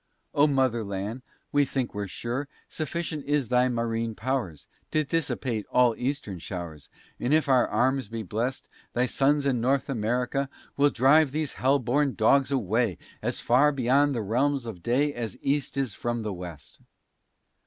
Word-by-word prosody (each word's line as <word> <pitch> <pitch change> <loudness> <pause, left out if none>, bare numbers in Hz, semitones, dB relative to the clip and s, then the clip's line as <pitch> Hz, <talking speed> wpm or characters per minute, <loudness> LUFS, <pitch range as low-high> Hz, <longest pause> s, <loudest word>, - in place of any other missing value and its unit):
O 145 +1 +5
mother 130 -5 +1
land, 100 +5 -4 0.3
we 145 0 +4
think 130 -2 -2
we're 100 -1 -3
sure, 120 +8 -4 0.2
Sufficient 155 -1 -4
is 145 -5 +1
thy 125 0 +3
marine 115 -1 -1
powers 110 - -3 0.2
To 155 - +1
dissipate 135 -7 -2
all 125 -2 +4
eastern 125 -8 -3
showers: 85 -5 -7 0.3
And 125 - -1
if 155 -1 +2
our 130 -3 +4
arms 130 -1 +1
be 115 +1 -5
blest, 115 +7 -3 0.3
Thy 125 +1 +2
sons 140 +3 +2
in 130 -4 +1
North 135 +3 +1
America 125 +3 -1 0.3
Will 145 +1 +4
drive 140 +4 +5
these 155 0 -2
hell 135 +2 +3
born 135 +2 +1
dogs 135 +5 +3
away 115 - +1 0.2
As - - -2
far 135 +5 +4
beyond 140 +1 +2
the 115 - -1
realms 130 +5 +1
of 105 -7 -7
day, 140 +8 +1
As 115 -6 -5
east 140 0 -1
is 135 -6 -1
from 120 -1 -3
the 105 -2 -3
west. 85 -6 -9
125 Hz, 165 wpm, -27 LUFS, 115-140 Hz, 0.3 s, O